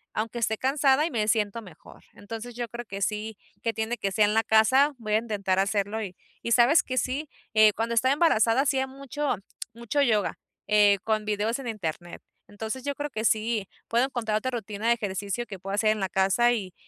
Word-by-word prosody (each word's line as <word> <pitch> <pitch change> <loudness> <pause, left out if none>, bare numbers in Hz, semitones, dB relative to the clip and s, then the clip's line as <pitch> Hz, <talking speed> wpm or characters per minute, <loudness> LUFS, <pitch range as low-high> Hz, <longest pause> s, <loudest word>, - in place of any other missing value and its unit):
aunque 225 +2 -2
esté 220 -1 0
cansada 275 +3 +2
y 335 - -3
me 215 -3 -1
siento 215 +1 0
mejor, 185 -5 -15
entonces 225 +3 -8
yo 240 -1 -3
creo 240 +1 -7
que 195 -2 -7
sí, 215 +1 -2 0.2
que 230 -1 -1
tiene 225 +2 -2
que 195 -3 -2
sea 215 0 +4
en 210 - +1
la 225 +1 +3
casa, 260 +7 +4
voy 215 -3 -4
a 215 - +5
intentar 200 -4 -1
hacerlo 200 +2 0
y 190 -4 -6 0.3
y 235 - 0
sabes 245 +7 +5
que 255 - -4
sí, 275 +4 -1 0.2
eh, 215 -1 +6
cuando 230 +1 -2
estaba 260 +4 +3
embarazada 260 -6 +3
hacía 265 -2 +1
mucho 275 +1 -3 0.4
mucho 235 +5 -1
yoga, 220 -7 +1 0.3
eh, 205 -1 +5
con 215 -1 0
videos 215 +4 -1
en 260 - -7
internet, 175 -5 -5 0.3
entonces 220 +5 -6
yo 285 0 -2
creo 290 +1 -4
que 220 -4 -4
sí 220 -2 +1 0.2
puedo 235 +3 +3
encontrar 225 -5 -2
otra 255 +4 -2
rutina 220 -2 -4
de 235 - +6
ejercicio 205 +1 -3
que 195 -5 -9
puedo 195 +2 -6
hacer 215 +1 +2
en 215 - -1
la 190 - -1
casa 195 +6 +3
y 190 -6 -4
220 Hz, 210 wpm, -26 LUFS, 210-245 Hz, 0.4 s, eh